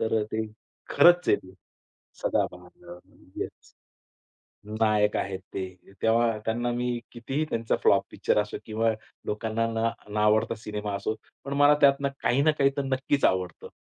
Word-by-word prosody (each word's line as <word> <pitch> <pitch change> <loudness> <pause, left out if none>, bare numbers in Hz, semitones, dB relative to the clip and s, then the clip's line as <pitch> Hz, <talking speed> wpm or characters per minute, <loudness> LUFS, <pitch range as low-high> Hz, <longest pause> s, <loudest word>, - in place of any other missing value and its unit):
तर 110 -1 +1
ते 110 0 -1 0.4
खरंच 175 +4 +6
आहे - - +5
ते. 95 0 -14 0.7
सदाबहार 90 -1 -3
अ, 90 - -13 0.4
येस, - - -7 1.1
नायक 105 -1 +3
आहेत 95 -1 -3
ते, 95 -1 -2 0.4
तेव्हा 115 0 +3
त्यांना 120 +2 0
मी 120 0 -1
कितीही 135 +6 -3
त्यांचा 115 -1 0
फ्लॉप - - +5
पिक्चर - - +1
असो 105 - -5
किंवा 110 +1 +1 0.3
लोकांना 110 +2 -1
न 115 +1 +1 0.2
न - - -2
आवडता 105 +2 +3
सिनेमा 105 -1 -5
असो, 105 +2 -2 0.3
पण 140 - -3
मला 145 +1 +7
त्यातनं 140 0 +4
काही 125 +4 +3
ना 155 - +5
काही 140 - +5
तर 140 - 0
नक्कीच 135 +1 0
आवडतं. 95 -1 -1
115 Hz, 150 wpm, -27 LUFS, 105-130 Hz, 1.1 s, मला